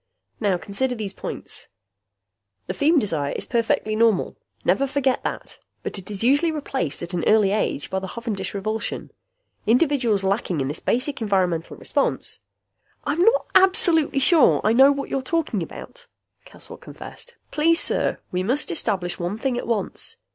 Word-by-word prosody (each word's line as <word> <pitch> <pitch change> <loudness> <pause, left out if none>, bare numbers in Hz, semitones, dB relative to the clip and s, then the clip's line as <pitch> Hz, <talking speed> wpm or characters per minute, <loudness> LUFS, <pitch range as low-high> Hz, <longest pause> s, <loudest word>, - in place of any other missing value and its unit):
Now 200 -4 +1
consider 245 +8 -2
these 210 -4 -5
points: - - -6 1.0
The - - -4
feem 310 +2 +3
desire 155 - -1
is - - -4
perfectly 225 -2 0
normal. 220 -3 +2 0.3
Never 275 - +2
forget 270 -2 0
that. - - -5 0.2
But - - -3
it 185 - -11
is 205 0 -5
usually 285 +7 +3
replaced 270 - -3
at 170 +1 -7
an 170 -2 -1
early 215 -2 +4
age 205 -8 -1
by 190 - 0
the 190 - -6
hovendish 205 -4 -5
revulsion. 215 +3 -3 0.6
Individuals 245 -5 +2
lacking 190 -4 -1
in 135 0 -1
this 150 - -3
basic 255 +2 -1
environmental 185 -6 0
response 285 - -1 0.4
" - - -42
"I'm 295 +3 -1
not 455 +7 +4
absolutely 370 -7 +5
sure 305 +1 +5
I 215 - +3
know 265 +4 +7
what 280 0 -3
you're 270 - 0
talking 295 - -1
about," 485 - -9 0.4
Caswell - - -11
confessed. - - -10 0.2
"Please, 330 +2 +3
sir! - - +2
We 180 - -1
must 250 +7 0
establish 175 +1 -2
one 175 +4 -3
thing 255 +2 -1
at 245 - -4
once. 225 -4 -2
230 Hz, 160 wpm, -23 LUFS, 195-285 Hz, 1.0 s, know